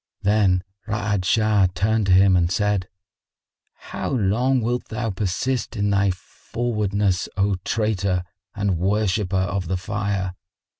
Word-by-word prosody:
Then 100 Hz, -3 st, +3 dB, 0.2 s
Ra'ad 105 Hz, -3 st, -1 dB
Shah 105 Hz, -1 st, +3 dB
turned 110 Hz, +1 st, +1 dB
to -, -, +3 dB
him 95 Hz, +1 st, +6 dB
and 85 Hz, -1 st, +2 dB
said, 100 Hz, -1 st, 0 dB, 0.9 s
"How -, -, -6 dB
long 125 Hz, +3 st, +1 dB
wilt 120 Hz, +2 st, -1 dB
thou 110 Hz, 0 st, -3 dB
persist 110 Hz, +8 st, -2 dB
in 100 Hz, -1 st, 0 dB
thy 100 Hz, 0 st, +3 dB
frowardness, 100 Hz, 0 st, -2 dB
O 100 Hz, 0 st, +2 dB
traitor 100 Hz, -5 st, 0 dB, 0.3 s
and 100 Hz, -4 st, 0 dB
worshipper 100 Hz, 0 st, 0 dB
of 95 Hz, -1 st, -1 dB
the 95 Hz, +2 st, -1 dB
Fire? 100 Hz, -1 st, -2 dB
100 Hz, 130 wpm, -23 LUFS, 95-110 Hz, 0.9 s, him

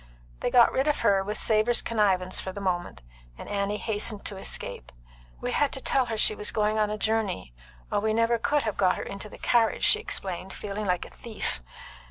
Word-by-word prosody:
They -, -, 0 dB
got 240 Hz, -2 st, +6 dB
rid 265 Hz, +3 st, 0 dB
of 300 Hz, -, +1 dB
her 195 Hz, -1 st, +3 dB
with 210 Hz, +2 st, -4 dB
Savor's 220 Hz, +2 st, +3 dB
connivance 190 Hz, -5 st, +1 dB
for 190 Hz, -, -5 dB
the 200 Hz, -, -7 dB
moment, 180 Hz, -, -2 dB, 0.3 s
and -, -, -9 dB
Annie 200 Hz, 0 st, -1 dB
hastened 210 Hz, -1 st, -2 dB
to 200 Hz, -, -5 dB
escape. -, -, -4 dB, 0.5 s
"We -, -, -3 dB
had 290 Hz, -2 st, +2 dB
to -, -, -2 dB
tell 265 Hz, -1 st, +1 dB
her 225 Hz, -1 st, -3 dB
she 215 Hz, -, +4 dB
was 210 Hz, 0 st, -2 dB
going 215 Hz, 0 st, +1 dB
a 210 Hz, 0 st, 0 dB
journey, 210 Hz, -, -1 dB, 0.4 s
or -, -, +2 dB
we 220 Hz, +1 st, 0 dB
never 230 Hz, +1 st, +2 dB
could 295 Hz, +4 st, +1 dB
have 215 Hz, -3 st, -2 dB
got 185 Hz, -2 st, +3 dB
her -, -, -4 dB
into 200 Hz, +2 st, -7 dB
the -, -, -11 dB
carriage," 230 Hz, -2 st, +2 dB
she 435 Hz, -, +5 dB
explained, 190 Hz, -, -4 dB
feeling 210 Hz, 0 st, -5 dB
like 180 Hz, -1 st, 0 dB
a -, -, -13 dB
thief. 215 Hz, -, -4 dB
210 Hz, 210 wpm, -27 LUFS, 195-230 Hz, 0.5 s, got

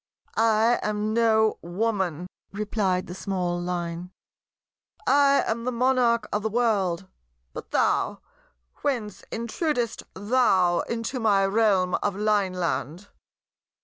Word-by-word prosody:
"I 225 Hz, +1 st, +3 dB
am 210 Hz, 0 st, -1 dB
no 220 Hz, -1 st, +3 dB
Woman," 180 Hz, -2 st, -2 dB, 0.3 s
replied 200 Hz, -3 st, -1 dB
the 175 Hz, -, -8 dB
small 180 Hz, -2 st, -2 dB
Line: 175 Hz, 0 st, -4 dB, 1.0 s
"I 280 Hz, 0 st, +4 dB
am 230 Hz, +1 st, -2 dB
the 255 Hz, -, -1 dB
Monarch 240 Hz, -2 st, +2 dB
of 210 Hz, -, 0 dB
the 220 Hz, -, -1 dB
world. 200 Hz, -6 st, 0 dB, 0.5 s
But -, -, -8 dB
thou, -, -, +1 dB, 0.6 s
whence 220 Hz, -8 st, -3 dB
intrudest 235 Hz, +1 st, -2 dB
thou 195 Hz, -5 st, +2 dB
into 235 Hz, +2 st, -3 dB
my 205 Hz, -4 st, +3 dB
realm 195 Hz, -3 st, +2 dB
of 205 Hz, -2 st, -1 dB
Lineland?" 185 Hz, -5 st, -1 dB
210 Hz, 110 wpm, -25 LUFS, 185-230 Hz, 1.0 s, I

